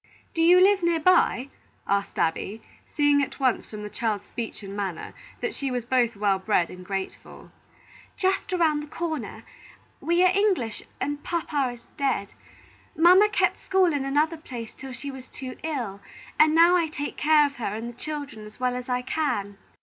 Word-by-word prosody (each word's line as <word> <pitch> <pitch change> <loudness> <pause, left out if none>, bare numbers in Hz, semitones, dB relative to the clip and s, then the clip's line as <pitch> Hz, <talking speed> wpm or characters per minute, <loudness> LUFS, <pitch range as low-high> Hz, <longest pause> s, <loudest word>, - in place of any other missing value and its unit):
"Do 330 - 0
you 350 +2 +7
live 390 +1 +5
near 340 -1 +2
by?" 310 -6 +3 0.4
asked 200 0 -1
Abby, 190 +6 -1 0.3
seeing 290 -1 +4
at 280 - -4
once 260 -3 +1
from 210 -1 -8
the 210 - -5
child's 215 -4 -2
speech 230 -2 -6
and 195 0 -7
manner 195 -5 -4 0.3
that 475 -4 -2
she 275 - -3
was 245 -2 -3
both 240 -2 +1
well 200 -1 +1
bred 190 -3 +1
and 180 0 -10
grateful. 195 +1 -6 0.7
"Just 385 +1 0
around 325 -5 +2
the 300 - -8
corner. 315 -4 -4 0.6
We 345 +2 +2
are 365 0 +4
English, 380 - +1 0.2
and 290 0 -3
papa 300 -6 -1
is 240 -1 -15
dead. 265 -9 -1 0.6
Mamma 365 +6 +7
kept - - +1
school 375 -3 +2
in 285 -2 -1
another 300 +4 +1
place 240 -7 -8
till 265 0 -9
she 265 +3 -6
was 260 -1 -11
too 260 -1 -7
ill, 240 -11 -4 0.4
and 310 +1 +6
now 340 +2 +7
I 340 -2 +2
take 290 -2 -5
care 305 -1 +4
of 280 -1 -5
her 240 - -4
and 225 +2 -5
the 240 - -7
children 290 -7 -5
as 210 +2 -13
well 250 0 0
as 250 0 -6
I 250 0 0
can." 205 -9 -2
275 Hz, 185 wpm, -25 LUFS, 225-320 Hz, 0.7 s, you